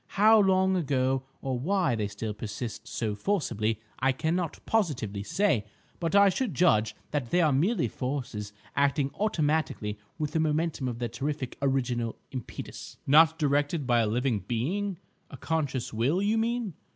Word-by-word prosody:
How 215 +2 +7
long 190 -1 +3
ago, 135 -5 +1 0.2
or 130 -2 -1
why 180 +1 +1
they 110 -3 -1
still 105 +1 -4
persist 110 +2 -6
so 110 -3 -2
forcibly, 110 - -1 0.2
I 135 +1 +3
cannot 160 +4 -1
positively 130 - 0
say. 130 - +1 0.3
But 165 +1 -1
I 200 0 +7
should 205 - -1
judge 110 -10 +3 0.2
that 145 -6 -2
they 175 - +2
are 160 -4 +4
merely 170 - +2
forces 120 -5 -4 0.2
acting 140 0 +2
automatically 155 - 0 0.2
with 150 -2 -2
the 160 - 0
momentum 155 -3 0
of 120 -2 -3
their 120 0 -2
terrific 135 +2 -3
original 125 -4 0 0.2
impetus." 130 -4 -7
"Not 160 +3 +6
directed 145 0 +1
by 120 -1 +3
a 115 - +2
living 120 0 0
being, 180 - -1 0.3
a - - -9
conscious 145 -8 -2
will, 125 +11 +1
you 205 +3 +2
mean?" 230 -3 -1
140 Hz, 155 wpm, -28 LUFS, 120-175 Hz, 0.3 s, How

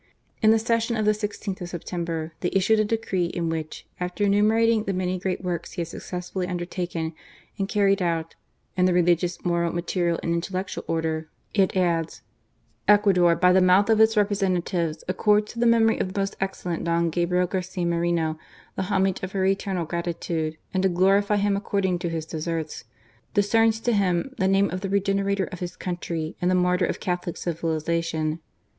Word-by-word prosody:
In 215 - +5
the 225 - +6
session 230 +1 0
of 215 - 0
the 210 - +5
i6th 210 -2 -4
of 175 - -5
September, 170 -2 -4
they 175 - -1
issued 195 +3 +3
a - - +4
decree 205 -5 -1
in 170 -1 -2
which, 160 -1 -5
after 180 +3 -2
enumerating 215 +2 +3
the 195 - -1
many 185 0 -1
great 185 0 -2
works 170 -2 -3
he - - -3
had 165 - -4
successfully 180 +1 -5
undertaken 175 -2 -3 0.5
and 195 0 -1
carried 200 -2 +2
out 165 -2 -1 0.2
" - - -45
in 180 - +3
the 180 -1 +3
religious, 175 0 +1
moral, 170 -1 +1
material, 175 0 -1
and 170 - 0
intellectual 185 +2 -3
order," 160 -1 -2 0.2
it 195 -2 +2
adds: 170 -3 0 0.3
" - - -41
Ecuador, 195 -5 +5
by 180 +2 +4
the 190 - +5
mouth 185 +4 +5
of 220 0 +4
its 220 0 +4
representatives, 185 -5 0
accords 210 +3 +2
to 235 - -7
the 240 - +3
memory 225 -1 +4
of 185 - -1
the 200 - -3
most 195 0 -1
excellent 180 -3 -3
Don 170 0 +1
Gabriel 180 +2 +1
Garcia 185 -1 -3
Moreno 170 -2 0 0.4
the - - -2
homage 190 -1 +1
of 185 0 -5
her 190 -1 +1
eternal 190 -2 0
gratitude, 165 -1 -3 0.2
and 190 - +1
to 190 - +3
glorify 195 +3 +3
him 205 0 +2
according 195 -3 0
to 175 -1 -2
his 165 -1 -3
deserts, 160 -3 -4 0.5
discerns 225 +2 +3
to 240 +1 +1
him 195 +4 +1
the 190 - +2
name 195 0 +3
of 185 +1 -4
The 195 - -3
Regenerator 200 0 +1
of 180 - -7
his 180 0 -5
country, 170 -3 -4
and 180 - +2
the 185 - +3
Martyr 180 0 +2
of - - -3
Catholic 180 -1 -3
Civilization. 165 -1 -1
180 Hz, 185 wpm, -25 LUFS, 170-200 Hz, 0.5 s, the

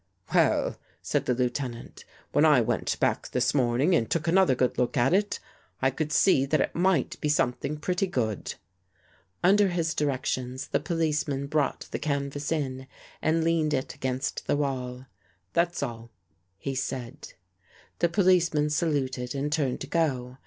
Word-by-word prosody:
" 95 - -16
Well," - - +2 0.3
said - - -1
the 125 - +2
Lieutenant, 125 -1 -3
" - - -31
when - - +3
I - - +6
went - - -1
back - - 0
this 125 0 +1
morning 130 +5 +2
and 115 -9 +2
took 165 -1 -1
another 175 -5 +4
good 125 0 0
look 125 +3 0
at 125 +6 +3
it, 205 +2 +1 0.4
I 135 0 +2
could 150 +3 -3
see 140 -4 +4
that 155 +2 +2
it - - 0
might 185 +1 +1
be 150 - 0
something 145 +1 0
pretty 180 +5 -1
good." 110 - -2 0.9
Under 200 +3 +5
his 170 -3 -1
directions 130 -2 -2
the - - +1
policeman 150 -3 -1
brought 145 -1 -1
the - - -3
canvas 140 0 -2
in 130 -4 -2 0.3
and 160 +1 +2
leaned 160 -2 +2
it 130 - -3
against 130 +1 -3
the - - +2
wall. 130 -3 -3 0.2
" 90 0 -40
That's 170 -2 +1
all," 115 -3 -6 0.5
he 135 +7 -4
said. 130 +1 -5 0.7
The 170 - +3
policeman 170 -5 +3
saluted 140 -5 -1
and 140 +2 -2
turned 140 -5 0
to - - -5
go. 130 -6 -1
140 Hz, 165 wpm, -27 LUFS, 130-165 Hz, 0.9 s, I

